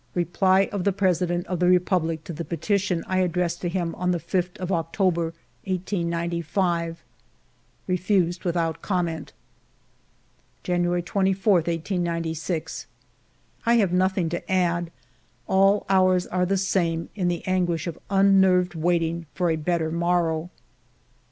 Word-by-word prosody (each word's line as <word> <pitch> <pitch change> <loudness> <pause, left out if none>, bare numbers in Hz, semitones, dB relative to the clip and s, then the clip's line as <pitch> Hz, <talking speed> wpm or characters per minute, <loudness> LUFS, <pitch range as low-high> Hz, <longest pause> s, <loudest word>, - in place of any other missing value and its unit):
Reply 185 +2 +2
of 200 -3 -2
the 200 - +2
President 180 -2 0
of 180 -3 -3
the 180 0 +3
Republic 175 -3 +1
to 170 - -7
the 165 +2 -5
petition 180 +1 -1
I 185 0 0
addressed 175 -1 0
to 175 - -1
him 170 -2 -2
on 180 0 -2
the 175 -1 +1
5th 180 +1 -2
of 185 0 -4
October, 170 0 +1 0.4
1895: 170 -2 -1 0.3
— - - -39
" - - -39
Refused 180 -1 +1
without 165 -2 -1
comment.'* 170 -5 -2 1.3
January 175 0 0
24, 195 +2 +1
1896. 165 -1 -2 0.8
I 235 - +5
have 200 -6 +2
nothing 185 -1 +2
to 175 +2 -5
add; 175 -2 +1 0.6
all 195 +2 +3
hours 185 -1 +3
are 180 0 0
the 195 +1 +1
same, 170 -4 0
in 185 -4 -1
the 175 -1 -2
anguish 175 -3 0
of 170 -3 -5
unnerved 190 -2 +4
waiting 165 0 0
for 175 0 +1
a - - +1
better 160 0 -1
morrow. 170 -1 0
175 Hz, 135 wpm, -24 LUFS, 170-185 Hz, 1.3 s, I